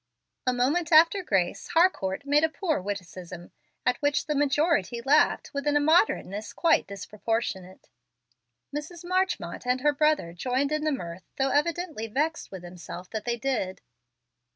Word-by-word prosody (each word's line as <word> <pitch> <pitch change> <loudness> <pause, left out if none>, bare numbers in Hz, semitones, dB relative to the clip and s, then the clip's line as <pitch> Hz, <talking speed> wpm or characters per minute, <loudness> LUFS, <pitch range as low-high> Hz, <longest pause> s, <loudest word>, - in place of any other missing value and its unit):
A - - +5
moment 295 +7 +1
after 330 +5 +6
"grace" 195 - 0
Harcourt 280 - +2
made 290 +2 +3
a 320 - +4
poor 315 - -1
witticism, 180 -2 -7 0.3
at 250 -1 +2
which 290 0 +1
the 300 - -1
majority 285 - +1
laughed 280 +6 +2
with 280 +1 -3
an 295 - +2
immoderateness 290 - +2
quite 335 -2 +3
disproportionate. 200 -1 -4 0.9
Mrs. 325 +4 -6
Marchmont 365 - -1
and 250 +1 +1
her 295 +1 +3
brother 300 - +1
joined 255 - -1
in 305 0 -1
the 310 - +2
mirth, 175 - -6
though 270 0 +1
evidently 310 -5 -1
vexed 305 +8 -1
with 190 -2 -9
themselves 180 0 -9
that 220 -1 -5
they 240 -1 -1
did. 230 -7 -2
270 Hz, 150 wpm, -27 LUFS, 200-310 Hz, 0.9 s, after